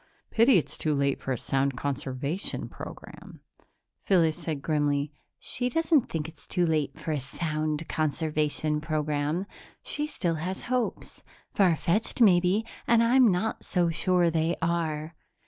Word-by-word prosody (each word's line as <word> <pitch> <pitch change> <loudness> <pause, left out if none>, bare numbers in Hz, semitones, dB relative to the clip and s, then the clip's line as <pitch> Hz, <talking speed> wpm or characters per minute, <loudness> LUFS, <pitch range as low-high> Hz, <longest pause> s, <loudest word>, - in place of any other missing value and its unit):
Pity 230 0 +5
it's 165 - -2
too 155 -2 +1
late 140 -1 +1
for 135 - -3
a 125 - 0
sound 135 +1 0
conservation 140 +5 -3
program." - - -10 0.6
Phyllis 165 -5 +3
said 155 -4 -5
grimly, 145 -2 0 0.3
"She 250 0 -2
doesn't 320 0 +2
think 160 -2 -3
it's 160 -1 -13
too 180 -2 +1
late 155 -4 -1
for 160 - -3
a 150 - 0
sound 155 +3 -3
conservation 155 0 0
program. 150 +2 -1 0.4
She 295 0 -2
still 175 - -2
has 185 +3 -4
hopes 250 -1 -2 0.3
far 185 -5 +4
fetched, 180 +10 -1
maybe, 190 0 +4 0.2
and 230 0 +5
I'm 245 -1 +5
not 200 +5 -1
so 175 -2 +1
sure 175 +1 +2
they 165 +1 +1
are. 165 -2 -1
160 Hz, 145 wpm, -27 LUFS, 150-185 Hz, 0.6 s, Pity